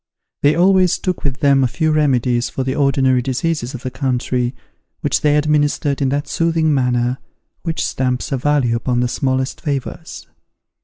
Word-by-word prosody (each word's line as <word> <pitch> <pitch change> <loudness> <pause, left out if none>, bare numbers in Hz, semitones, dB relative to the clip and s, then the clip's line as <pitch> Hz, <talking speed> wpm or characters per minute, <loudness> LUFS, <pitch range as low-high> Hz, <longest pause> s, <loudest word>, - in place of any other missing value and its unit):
They 145 +1 +4
always 185 0 +4
took 185 -2 -3
with 135 -2 -3
them 140 -2 +4
a - - +3
few 155 +6 0
remedies 125 -5 +1
for 135 - -3
the 130 0 -1
ordinary 135 -3 +2
diseases 135 +1 -2
of 125 - -9
the 130 - -4
country, 125 -2 -1 0.5
which - - 0
they 150 0 +3
administered 145 -1 +1
in 135 - +2
that 145 +2 -2
soothing 165 -2 +1
manner 125 -1 0 0.4
which 165 -2 -2
stamps 125 +2 -2
a 135 - +1
value 130 -3 +1
upon 120 +1 0
the 125 - +1
smallest 130 +1 -2
favours. 140 -5 -5
135 Hz, 165 wpm, -18 LUFS, 125-150 Hz, 0.5 s, They